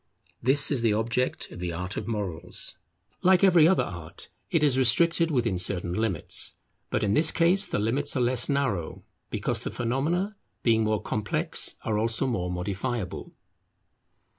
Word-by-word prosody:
This 140 +5 +4
is 135 -5 0
the 115 -2 +2
object 115 +4 -2
of - - -10
the 90 -1 -3
art 90 +4 -5
of 105 - -5
Morals. 100 -8 -5 0.5
Like 185 0 +4
every 175 -5 +6
other 190 - +3
art, 85 -3 -9 0.2
it 160 - +1
is 140 -4 +3
restricted 165 +6 +4
within 115 - 0
certain 90 -2 0
limits. 105 -4 -1 0.3
But - - -1
in 100 -1 +1
this 155 +6 +6
case 180 +4 +3
the - - -2
limits 130 +9 0
are - - +1
less 120 +1 +1
narrow, 130 - -2 0.3
because - - -2
the - - -5
phenomena, 160 - -2 0.3
being 110 -2 +3
more 110 -1 -1
complex, 105 -1 +1
are 105 -1 -1
also 115 +1 +1
more 95 -9 -2
modifiable. 95 +4 -4
115 Hz, 160 wpm, -26 LUFS, 100-145 Hz, 0.5 s, every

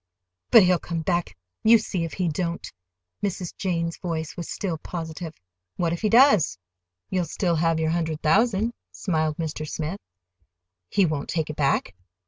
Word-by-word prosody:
"But 225 -4 +9
he'll 180 -1 +4
come 170 -1 -3
back—you 175 - +2
see 195 -5 -3
if 165 - -7
he 180 -2 -1
don't!" 170 +2 -3 0.5
Mrs. 185 -3 -3
Jane's 170 -3 -1
voice 160 -3 -3
was 170 -2 -6
still 175 -6 -3
positive. 165 -1 -6 0.4
"What 170 -1 0
if 170 - -4
he 215 - +2
does? 225 - +5 0.5
You'll 180 -2 +1
still 170 +1 0
have 165 0 +2
your 160 0 +1
hundred 160 -2 -2
thousand," 220 +6 +3 0.2
smiled 155 -4 -1
Mr. 155 -2 -4
Smith. 160 +5 -3 0.9
"He 200 - +3
won't 155 -4 -2
take 160 -2 -1
it - - -9
back?" 140 -9 +1
170 Hz, 155 wpm, -25 LUFS, 160-185 Hz, 0.9 s, But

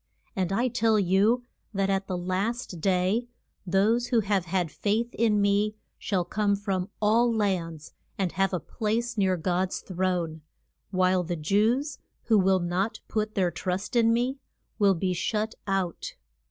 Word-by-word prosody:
And 185 -2 -1
I 235 +6 +2
tell 225 -2 +2
you 205 +6 +3 0.3
that 195 0 +1
at 195 0 -1
the 185 - -2
last 185 +1 -2
day 190 +6 +1 0.4
those 215 +6 +2
who 240 -3 +3
have 195 -3 0
had 175 -2 -1
faith 225 +4 -1
in 215 -2 +2
me 205 +1 +2 0.2
shall 185 -4 -1
come 205 +2 +1
from 195 -2 -2
all 230 +3 +3
lands, 175 -8 -2 0.2
and 190 -3 0
have 195 +2 +1
a 180 - -1
place 230 +5 -2
near 190 -3 +2
God's 180 +2 -1
throne; 180 -4 -2 0.5
while 185 -1 +2
the 175 0 -3
Jews, 220 - +1 0.2
who 220 -3 +4
will 190 0 +3
not 185 +6 -1
put 215 0 -2
their 185 -3 +2
trust 180 +6 -3
in 230 -1 +5
me, 250 +4 0 0.4
will 200 -2 +4
be 185 +2 0
shut 215 +5 -1
out. 190 -3 -2
195 Hz, 155 wpm, -27 LUFS, 185-220 Hz, 0.5 s, in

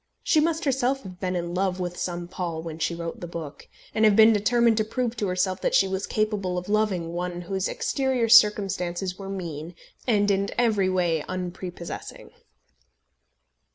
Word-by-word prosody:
She 315 - +3
must 325 +1 0
herself 270 0 +1
have 185 -2 -10
been 185 -1 -2
in 175 0 -3
love 185 0 0
with 180 -1 -3
some 175 -1 -4
Paul 170 -3 -4
when 160 -1 -7
she 170 +1 -1
wrote 170 -1 -5
the 175 - -6
book, 165 -4 -8 0.3
and 220 - +1
have 215 -2 +6
been 220 +1 +7
determined 230 +2 +3
to 215 - +3
prove 240 +2 -2
to 210 - -1
herself 185 +1 0
that - - +1
she 195 - +5
was 190 +1 -3
capable 210 -4 -1
of 180 - -4
loving 200 -6 0
one 175 0 -3
whose 190 +2 -2
exterior 265 -4 0
circumstances 195 -4 +3
were 195 0 -7
mean 170 -3 -6 0.3
and 205 -3 +3
in 195 0 +1
every 215 -6 +2
way 175 -4 +1
unprepossessing. 180 -1 -6
190 Hz, 175 wpm, -25 LUFS, 175-215 Hz, 0.3 s, been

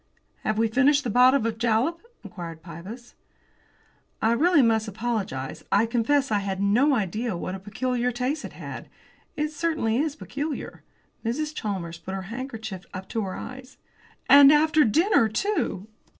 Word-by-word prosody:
"Have 215 - -1
we 225 +1 +3
finished 275 +5 +3
the 240 - -2
bottle 250 +1 +5
of 225 -1 -2
jalap?" 235 +8 +1 0.2
inquired 165 -5 -8
Pybus. 185 +9 -10 1.1
"I 225 - +2
really 300 +4 +4
must 220 -1 +2
apologise; 210 - -3
I 205 +3 +4
confess 250 +4 +1
I 210 - +2
had 195 -1 -3
no 240 +9 +3
idea 215 0 -2
what 185 - -4
a 190 - -5
peculiar 245 +5 -2
taste 255 +5 -2
it - - -8
had; - - -8 0.5
it 300 0 0
certainly 310 -8 0
is 295 +1 0
peculiar." 295 0 -5 0.4
Mrs. 300 +7 -2
Chalmers 185 - -4
put 190 +3 -6
her 190 - -4
handkerchief 225 -7 -6
up 190 +1 -7
to 225 - -2
her 190 -2 -4
eyes. 260 +1 -9 0.5
"And 280 0 +9
after 305 0 +4
dinner, 315 - +3
too!" 290 - -1
235 Hz, 155 wpm, -25 LUFS, 205-280 Hz, 1.1 s, And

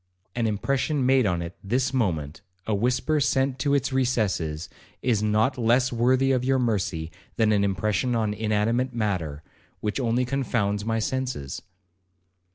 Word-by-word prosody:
An 120 -2 +1
impression 135 +6 0
made 130 -3 +4
on 85 -2 0
it 85 +2 -7
this 125 +7 0
moment, 85 - -1 0.2
a 110 - -1
whisper 125 +8 +1
sent 135 +1 +1
to 140 +1 +2
its 135 -1 0
recesses, 100 -11 0 0.4
is 115 -5 +2
not 110 +5 +1
less 120 +2 +3
worthy 130 +3 +3
of 130 -2 +1
your 135 +1 +2
mercy 95 -9 -1 0.2
than 110 -2 +3
an 100 -1 +3
impression 105 +5 0
on 110 -2 0
inanimate 110 +4 0
matter, 90 -10 -2 0.4
which 105 +4 -2
only 125 0 +1
confounds 115 -6 -1
my 115 +1 0
senses.' 125 - -3
115 Hz, 150 wpm, -25 LUFS, 100-130 Hz, 0.4 s, made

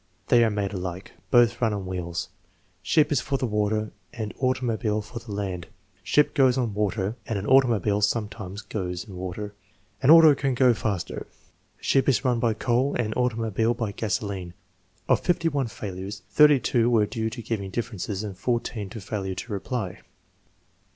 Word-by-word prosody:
"They 120 -1 +6
are 115 - +3
made 105 -1 -2
alike." 90 0 -5 0.2
"Both 120 -2 +4
run 115 -3 +2
on 100 -2 -5
wheels." 90 -1 -4 0.5
"Ship 155 -2 +3
is 140 - +2
for 135 0 -1
the 130 - -1
water 105 -1 0 0.2
and 110 -2 -5
automobile 120 -4 0
for 115 +3 -8
the 115 -2 -11
land." 95 -4 -4 0.3
"Ship 145 +10 +2
goes 130 -2 +4
on 120 -5 0
water 105 +1 -1
and 110 - -1
an 100 - -4
automobile 115 -6 +3
sometimes 105 -2 -2
goes 90 -4 -4
in 105 -4 -11
water." 95 +3 -5 0.5
"An 130 - +3
auto 160 -1 +9
can 135 -2 -1
go 125 -1 +5
faster." 105 -5 -3 0.5
"Ship 135 0 +2
is 135 +1 +1
run 125 -2 +2
by 115 -2 +1
coal 125 +5 +1
and 110 -3 -1
automobile 115 -2 0
by 115 -4 -2
gasoline." 100 -4 -3 0.5
Of - - +4
51 165 -7 0
failures, 95 -2 -7
32 130 -5 +5
were 110 -3 +4
due 110 +1 -2
to 120 +1 -7
giving 100 -4 -3
differences 105 -2 -4
and 100 -3 -5
14 115 -1 -2
to 110 - -7
failure 95 -2 -4
to 115 - -6
reply. 100 -2 -3
110 Hz, 165 wpm, -25 LUFS, 100-125 Hz, 0.5 s, auto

